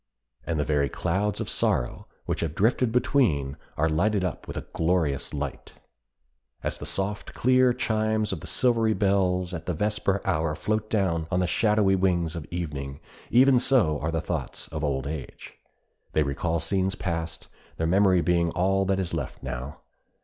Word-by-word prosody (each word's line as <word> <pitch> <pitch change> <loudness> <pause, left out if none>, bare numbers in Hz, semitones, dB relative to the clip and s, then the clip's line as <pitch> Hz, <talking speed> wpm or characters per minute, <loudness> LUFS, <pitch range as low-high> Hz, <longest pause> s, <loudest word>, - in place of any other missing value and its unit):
And 80 -2 -1
the - - +2
very 70 -2 +1
clouds 95 +7 -1
of - - -3
sorrow - - -1 0.2
which - - -2
have 80 -2 -2
drifted 115 +3 +2
between 95 - +2 0.2
are 80 - +2
lighted 95 +6 +1
up 90 - -4
with - - -6
a - - -5
glorious 80 -5 0
light. 75 -1 -5 0.9
As - - -2
the - - -5
soft, 100 +2 -2
clear 130 0 +4
chimes 110 -2 0
of 90 - -4
the - - -9
silvery 115 -3 +2
bells 90 -2 +1
at 85 - -6
the 90 - -1
vesper 100 +1 0
hour 80 0 0
float 110 +5 -1
down 85 -6 0
on 90 - +1
the 90 - +2
shadowy 105 +1 +3
wings 90 -3 +1
of 80 -3 -6
evening, 75 -5 -4 0.3
even 130 +1 +6
so 115 - +2
are 75 - -2
the 80 -1 -1
thoughts 80 -4 -4
of 75 0 -4
old 70 -3 -1
age. 75 -1 -7 0.6
They 80 - +3
recall 80 +4 -1
scenes 95 +3 0
past, 85 -2 -4 0.3
their 80 - 0
memory 95 +1 +4
being 85 +1 +2
all 95 +2 +2
that 95 0 +1
is 90 -3 -3
left 75 -5 -4
now. 65 +2 -6
90 Hz, 170 wpm, -26 LUFS, 80-105 Hz, 0.9 s, even